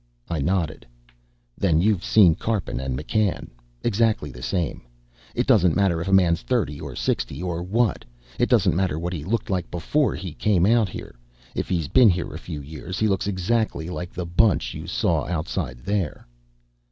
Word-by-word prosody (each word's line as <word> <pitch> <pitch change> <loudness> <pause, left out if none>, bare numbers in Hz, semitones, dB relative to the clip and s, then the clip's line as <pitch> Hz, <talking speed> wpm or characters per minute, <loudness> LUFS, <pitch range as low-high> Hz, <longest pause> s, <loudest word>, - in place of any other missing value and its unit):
I 85 - -1
nodded. 80 -5 -1 0.7
"Then 85 -5 +3
you've 100 0 +2
seen 95 -7 +6
Karpin 105 - -2
and 65 -1 -3
McCann. 100 +6 -1 0.3
Exactly 110 -9 +1
the - - -11
same. 85 +2 -2 0.5
It - - +1
doesn't 90 -3 +4
matter 95 -5 +2
if 85 - -4
a - - 0
man's 90 -3 +4
thirty 70 +4 -1
or - - -7
sixty - - -2
or 85 -2 -2
what. 105 +3 0 0.4
It - - +2
doesn't - - +3
matter 90 -4 0
what 85 +2 -3
he 80 -5 -4
was 110 +7 -1
like 95 -3 -2
before 135 - 0
he 90 -5 -6
came 95 -2 +2
out 110 -1 +3
here. - - -8 0.4
If - - -3
he's 85 -5 0
been 125 - +6
here 90 -2 -1
a - - -6
few 75 - -6
years, 80 +6 -7
he 110 - +2
looks 95 -1 0
exactly 95 -3 -1
like 90 0 -5
the 90 -1 -4
bunch 90 +3 +2
you - - -7
saw - - 0
outside 75 -7 -3
there." 100 -6 -2
90 Hz, 180 wpm, -24 LUFS, 80-100 Hz, 0.7 s, seen